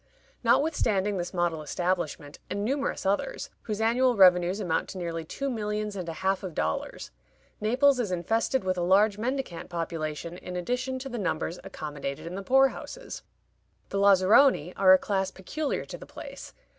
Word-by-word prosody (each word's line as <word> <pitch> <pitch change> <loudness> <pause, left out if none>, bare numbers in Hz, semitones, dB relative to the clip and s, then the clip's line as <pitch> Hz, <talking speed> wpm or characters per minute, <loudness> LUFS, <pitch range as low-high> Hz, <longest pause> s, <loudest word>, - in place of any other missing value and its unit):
Notwithstanding 210 -10 +2
this 175 0 -3
model 175 -3 0
establishment, 165 -2 -2
and 200 +1 -2
numerous 275 -1 -1
others, 205 - -1
whose 210 -2 -4
annual 245 +3 +3
revenues 180 0 +5
amount 175 -6 -1
to 195 - -7
nearly 165 -2 -3
two 275 - -4
millions 210 -4 -2
and 180 -3 -4
a - - -3
half 195 0 +2
of 180 -5 -6
dollars, 80 +1 -3 0.5
Naples 255 +5 +3
is 215 -6 -1
infested 225 +8 0
with 185 -1 -1
a - - 0
large 200 +4 +3
mendicant 255 -8 -3
population 165 0 -4
in 180 - -7
addition 250 +8 -2
to 265 +1 -6
the 240 -2 -4
numbers 175 -2 -2
accommodated 150 -7 -6
in 170 - -6
the 195 - -4
poor 270 +6 +5
houses. - - -8 0.7
The 195 - -1
Lazaroni 200 - +5
are 190 -1 +6
a 185 - +9
class 190 -1 -1
peculiar 285 +12 -3
to - - -8
the - - -11
place. - - -10
195 Hz, 170 wpm, -27 LUFS, 175-235 Hz, 0.7 s, a